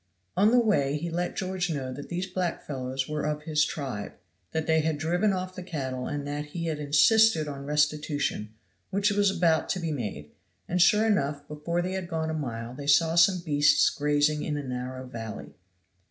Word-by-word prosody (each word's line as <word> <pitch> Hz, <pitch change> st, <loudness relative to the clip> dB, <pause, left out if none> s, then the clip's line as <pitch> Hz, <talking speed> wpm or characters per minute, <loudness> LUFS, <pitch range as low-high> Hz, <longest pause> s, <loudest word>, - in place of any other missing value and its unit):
On 205 Hz, +2 st, +5 dB
the 245 Hz, -, +4 dB
way 150 Hz, -, +2 dB
he 170 Hz, +3 st, -4 dB
let 175 Hz, +1 st, -2 dB
George 185 Hz, -1 st, -2 dB
know 135 Hz, -5 st, -3 dB
that 145 Hz, +2 st, -8 dB
these 180 Hz, +1 st, -2 dB
black 185 Hz, -2 st, -3 dB
fellows 130 Hz, -1 st, -3 dB
were 150 Hz, 0 st, -3 dB
of 150 Hz, 0 st, -2 dB
his 150 Hz, -2 st, +2 dB
tribe, 130 Hz, -10 st, -4 dB, 0.4 s
that 160 Hz, -1 st, -1 dB
they 160 Hz, 0 st, +3 dB
had 160 Hz, -1 st, 0 dB
driven 175 Hz, +7 st, +1 dB
off 185 Hz, -1 st, -3 dB
the 185 Hz, -, -6 dB
cattle 130 Hz, -8 st, -4 dB
and 145 Hz, -1 st, -3 dB
that 145 Hz, +1 st, -3 dB
he 170 Hz, +3 st, -5 dB
had 155 Hz, -2 st, -2 dB
insisted 155 Hz, +5 st, +4 dB
on 140 Hz, -1 st, -6 dB
restitution 150 Hz, -6 st, 0 dB, 0.4 s
which 200 Hz, +2 st, +1 dB
was 205 Hz, 0 st, +3 dB
about 170 Hz, -4 st, +2 dB
to 190 Hz, -, 0 dB
be 165 Hz, -2 st, -2 dB
made; 100 Hz, -, -5 dB, 0.4 s
and 180 Hz, +1 st, +1 dB
sure 210 Hz, +5 st, +5 dB
enough, 145 Hz, -9 st, 0 dB
before 170 Hz, +4 st, -2 dB
they 180 Hz, -, -2 dB
had 190 Hz, -2 st, -3 dB
gone 160 Hz, -1 st, -2 dB
a -, -, -3 dB
mile 120 Hz, -6 st, -4 dB
they 140 Hz, +2 st, -8 dB
saw 160 Hz, +3 st, +4 dB
some 175 Hz, +2 st, +5 dB
beasts 145 Hz, -2 st, +4 dB
grazing 150 Hz, +1 st, +1 dB
in 150 Hz, -2 st, -2 dB
a 145 Hz, -, -4 dB
narrow 130 Hz, 0 st, -5 dB
valley. 110 Hz, -, -7 dB
150 Hz, 195 wpm, -27 LUFS, 140-175 Hz, 0.4 s, On